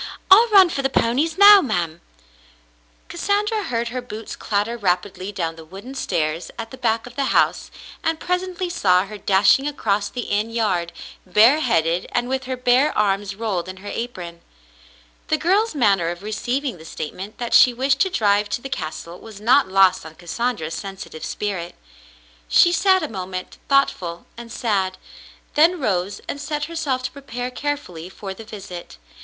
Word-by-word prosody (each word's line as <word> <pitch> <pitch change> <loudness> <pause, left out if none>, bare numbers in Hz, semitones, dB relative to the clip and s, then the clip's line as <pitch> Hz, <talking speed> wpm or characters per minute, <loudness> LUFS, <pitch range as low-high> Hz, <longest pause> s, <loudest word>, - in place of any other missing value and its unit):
I'll 445 +5 +8
run 390 -5 +6
for 275 - -2
the 270 - 0
ponies 275 +8 +1
now, 405 0 +9
ma'm. 170 - -2 1.1
Cassandra 420 +2 0
heard 235 -1 -2
her 250 +1 -4
boots 225 -2 -8
clatter 210 +3 -1
rapidly 190 -1 -2
down 165 -4 -3
the 160 - -10
wooden 195 +11 -10
stairs 165 - -2
at 225 0 -6
the 260 - -9
back 225 -3 0
of 245 0 -12
the 275 0 0
house, - - +1 0.3
and 325 0 0
presently 360 0 -2
saw 185 - +2
her 210 +1 -9
dashing 200 +8 +3
across 210 -8 -1
the 245 - -5
inn 210 0 -1
yard, 190 -7 -1 0.3
bareheaded 185 - +3
and 245 0 0
with 260 0 -2
her 260 0 -4
bare 250 +4 +2
arms 200 -1 0
rolled 195 -5 -3
in 185 - -8
her 205 +2 -8
apron. 175 -8 -6 0.9
The 310 - +1
girl's 390 +5 +1
manner 200 - +2
of 175 +2 -6
receiving 240 - -3
the 160 - -12
statement 185 +6 -7
that 240 -1 -4
she 250 - +7
wished 265 +3 0
to 380 - +3
drive 205 - +1
to - - -3
the 270 - -6
castle 170 - -6
was 220 -3 -12
not 250 +6 +4
lost 190 -1 +4
on 160 0 -11
Cassandra's 175 -1 -3
sensitive 195 -5 -7
spirit. 185 -5 -4 0.7
She 345 - +5
sat 375 0 +3
a - - -1
moment, 185 -4 -6
thoughtful 185 -11 +1
and 235 0 -10
sad, 195 -6 -1 0.6
then 330 +4 +4
rose 195 -6 -1
and 285 - -5
set 295 +1 -3
herself 295 -6 -2
to - - -3
prepare 250 -3 -6
carefully 250 - -4
for 195 0 -7
the 225 - -11
visit. 195 -5 -9
225 Hz, 170 wpm, -21 LUFS, 185-275 Hz, 1.1 s, now